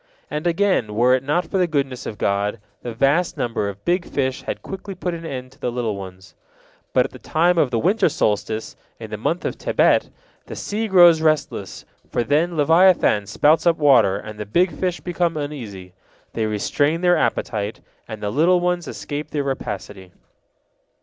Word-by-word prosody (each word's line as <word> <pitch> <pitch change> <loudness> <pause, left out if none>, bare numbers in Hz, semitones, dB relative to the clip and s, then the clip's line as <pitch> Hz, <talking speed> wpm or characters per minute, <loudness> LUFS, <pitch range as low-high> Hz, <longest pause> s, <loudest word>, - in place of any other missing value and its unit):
And, 150 +3 -2
again, 170 - +1
were 125 +3 +4
it 130 - +2
not 150 +6 0
for 190 - -2
the 180 - +3
goodness 140 -5 -2
of 105 - -6
God, 100 +3 -1 0.2
the 120 - -5
vast 140 +9 +1
number 115 -4 -1
of 100 0 -11
big 175 +1 +1
fish 130 -5 -2
had - - -5
quickly 195 0 -7
put 180 -1 -3
an 165 -1 -6
end 130 -3 -6
to 135 - -22
the 125 - -2
little 120 -3 -2
ones. 95 -1 -10 0.6
But - - +3
at - - -6
the - - -12
time 170 +2 +2
of 145 - +3
the 120 - -1
winter 185 - +2
solstice, 110 -3 -1 0.2
in 110 -2 -9
the 105 - -4
month 165 - -2
of - - -3
Tebet, - - +2 0.4
the - - -7
sea 220 +2 -3
grows 175 -5 +6
restless, 155 -2 -1 0.2
for 120 - 0
then 160 +6 +1
leviathan 160 - +4
spouts 155 - +3
up 170 - +4
water, 135 -10 +4
and 105 +1 -9
the 105 - -4
big 175 - +2
fish 175 +3 -2
become 175 -2 -1
uneasy. 110 -12 -6 0.4
They 110 -1 -1
restrain 145 +10 0
their 175 -1 +4
appetite, 105 -8 -2 0.3
and 110 -2 -8
the 105 - -1
little 170 +8 +3
ones 175 -1 -1
escape 150 0 -5
their 145 -2 -2
rapacity. 100 -8 -5
145 Hz, 185 wpm, -21 LUFS, 110-175 Hz, 0.6 s, grows